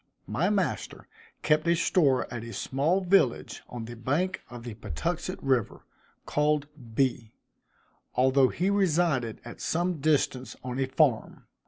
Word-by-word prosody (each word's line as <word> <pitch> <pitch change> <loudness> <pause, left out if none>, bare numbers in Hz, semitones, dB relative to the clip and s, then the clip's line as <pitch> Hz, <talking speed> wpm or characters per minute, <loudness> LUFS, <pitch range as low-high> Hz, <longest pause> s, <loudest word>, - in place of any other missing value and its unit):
My 180 +5 0
master 200 -4 -2 0.4
kept 155 +1 +2
a 170 - +4
store 150 -6 +3
at 115 -2 -5
a 115 0 -8
small 155 +8 0
village 180 -10 +2
on 120 -2 -6
the 120 +1 -8
bank 150 +11 -1
of 120 0 -9
the 120 -2 -6
Patuxent 80 -8 -3
river, 130 -5 0 0.4
called 150 0 +1 0.3
B, 120 -4 0 0.8
although 130 +1 +4
he 185 +3 0
resided 165 - +1
at 120 - -9
some 175 0 0
distance 135 -4 0
on 125 +1 -4
a 135 - +1
farm. 130 -3 +1
135 Hz, 140 wpm, -28 LUFS, 120-170 Hz, 0.8 s, a